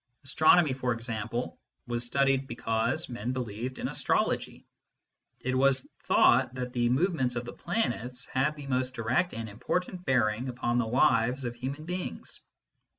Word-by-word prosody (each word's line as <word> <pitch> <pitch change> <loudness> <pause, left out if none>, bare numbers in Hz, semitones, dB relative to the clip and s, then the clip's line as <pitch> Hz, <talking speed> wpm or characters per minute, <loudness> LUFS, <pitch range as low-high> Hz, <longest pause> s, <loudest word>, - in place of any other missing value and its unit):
Astronomy, 155 +2 +4
for 125 -2 -1
example, 115 +1 -4 0.3
was 120 -1 -1
studied 135 +2 +1
because 115 -2 -1
men 120 0 -3
believed 125 0 -4
in - - -2
astrology: - - -1 0.7
it 130 - -2
was 130 0 +3 0.2
thought 125 - +4
that 125 -1 -4
the 120 -1 +2
movements 130 -3 +1
of 120 0 -3
the 120 - -7
planets 125 - -2
had 135 +4 0
the 145 -2 -9
most 130 -1 -1
direct 125 +10 0
and 115 0 -4
im 105 +1 -12
portant 180 0 -2
bearing 125 -3 +1
upon 120 -1 0
the 120 - 0
lives 125 0 +3
of 120 - -2
human 135 +5 -5
beings. 180 +1 -5
125 Hz, 155 wpm, -29 LUFS, 120-135 Hz, 0.7 s, Astronomy